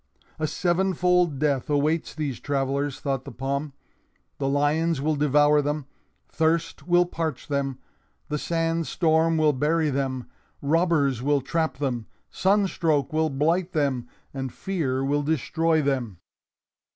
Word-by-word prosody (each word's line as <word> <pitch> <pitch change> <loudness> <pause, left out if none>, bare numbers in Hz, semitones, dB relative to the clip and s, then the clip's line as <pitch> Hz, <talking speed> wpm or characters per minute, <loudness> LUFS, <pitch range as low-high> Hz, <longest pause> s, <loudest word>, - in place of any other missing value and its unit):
"A 155 - 0
seven 180 +3 0
fold 180 -3 +2
death 140 -2 0
awaits 150 +3 0
these 145 -6 -3
travelers," 140 0 -1
thought 135 -2 -2
the 140 - -9
palm. 140 +4 -3 0.7
"The 135 -1 0
lions 150 +3 +1
will 155 +2 0
devour 150 +1 +4
them, 145 0 -2 0.4
thirst 160 -1 -1
will 175 0 +4
parch 160 -5 -4
them, 140 -2 -1 0.5
the 150 - -2
sand 165 0 -1
storm 160 -1 +2
will 155 -1 +4
bury 150 +3 +1
them, 130 -2 -2 0.3
robbers 145 -4 +2
will 145 +1 +2
trap 160 +1 -1
them, 125 -6 -2 0.2
sunstroke 175 -8 +1
will 160 0 +2
blight 165 +6 0
them, 135 -6 0 0.3
and 135 -2 -4
fear 135 -9 -2
will 145 +1 +1
destroy 160 +2 +1
them." 125 -9 -1
150 Hz, 135 wpm, -25 LUFS, 135-165 Hz, 0.7 s, devour